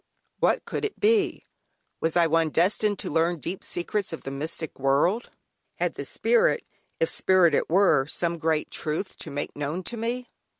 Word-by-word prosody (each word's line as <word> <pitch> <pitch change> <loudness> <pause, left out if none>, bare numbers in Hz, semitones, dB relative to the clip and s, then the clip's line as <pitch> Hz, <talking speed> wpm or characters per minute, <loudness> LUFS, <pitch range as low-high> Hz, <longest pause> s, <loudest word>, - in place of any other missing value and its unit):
What - - +2
could - - -4
it 425 - -3
be? 415 -5 +2 0.5
Was 160 +1 0
I 170 - +5
one 165 0 +2
destined 205 +6 +2
to - - -4
learn 165 +3 +2
deep 175 +5 -5
secrets 195 +3 -2
of 165 - -6
the 135 - -5
mystic 155 +3 -5
world? 145 - +2 0.5
Had - - -1
the - - -6
spirit, 485 0 +2 0.3
if 485 - +3
spirit 185 - +4
it - - +1
were, 175 -6 +4
some 170 +1 -1
great 160 -1 0
truth 160 +6 -3
to - - -8
make 145 +1 -4
known 150 +5 -3
to 235 - -4
me? 240 +2 -3
170 Hz, 175 wpm, -26 LUFS, 155-215 Hz, 0.5 s, I